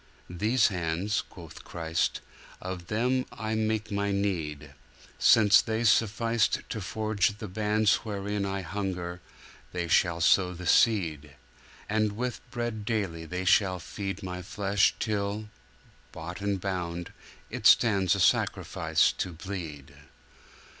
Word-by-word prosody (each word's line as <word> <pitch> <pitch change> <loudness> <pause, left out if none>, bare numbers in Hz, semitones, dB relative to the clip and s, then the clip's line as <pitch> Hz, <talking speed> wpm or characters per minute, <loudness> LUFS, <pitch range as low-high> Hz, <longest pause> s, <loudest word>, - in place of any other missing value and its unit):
'These 110 +9 +2
hands,' 90 +2 -1
quoth 80 -3 -13
Christ, 80 0 -2 0.4
'Of 90 -2 -6
them 125 +4 +1
I 110 0 -4
make 110 0 -1
My 100 0 0
need: 80 -7 -2 0.5
Since 105 -2 +6
they 110 0 -2
sufficed 115 0 +2
to 110 - -4
forge 105 +1 0
the 105 - -6
bands 105 +2 +2
Wherein 100 -1 -3
I 100 0 -2
hunger, 90 -2 -4 0.5
they 90 -1 -2
shall 85 0 +2
sow 90 +2 +3
the 90 +1 -8
seed! 80 -9 +2 0.5
And 110 -1 +1
with 125 +3 -3
bread 120 -3 -3
daily 100 -7 -2
they 90 +3 -4
shall 95 0 +4
feed 95 +3 -6
My 90 -1 -5
Flesh 100 +2 +1
till, 105 0 -2 0.6
bought 85 +4 -7
and 100 -1 -1
bound, 90 -2 -4 0.4
It - - +2
stands 100 -5 +5
A - - -3
Sacrifice 80 -3 +2
to 90 - -2
bleed. 80 -6 -7
100 Hz, 125 wpm, -28 LUFS, 90-110 Hz, 0.6 s, Since